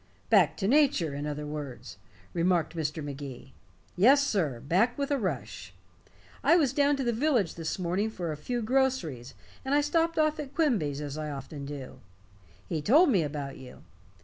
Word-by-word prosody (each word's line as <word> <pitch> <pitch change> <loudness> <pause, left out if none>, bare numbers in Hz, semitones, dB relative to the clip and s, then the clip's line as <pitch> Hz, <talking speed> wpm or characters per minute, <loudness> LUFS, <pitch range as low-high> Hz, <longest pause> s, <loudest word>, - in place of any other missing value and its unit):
"Back - - +5
to 195 - -1
nature, 250 - +3
in 145 +1 -4
other 150 0 -4
words," 140 -7 -7 0.4
remarked 170 -2 +1
Mr. 155 -1 -3
Magee. 140 -2 -8 0.4
"Yes, 270 +9 +5
sir 160 - 0
back 190 - +1
with 280 0 -2
a 280 - +1
rush. 125 - -4 0.7
I 315 +5 +5
was 290 -7 +3
down 285 0 +3
to 275 - -2
the 240 -1 0
village 235 - +1
this 165 -1 -4
morning 185 +4 -1
for 175 -6 -4
a - - -3
few 240 +10 -3
groceries, 220 - 0 0.3
and 270 +2 0
I 290 - +4
stopped 330 +3 +1
off 310 0 +2
at 285 -2 -7
Quimby's, 185 - +1
as 145 +1 -5
I 155 -1 -4
often 140 0 -7
do. 140 -2 -8 0.7
He 160 -3 -2
told 295 - +5
me 195 -7 +3
about 145 -2 -4
you. 125 -1 -12
175 Hz, 175 wpm, -28 LUFS, -, 0.7 s, Back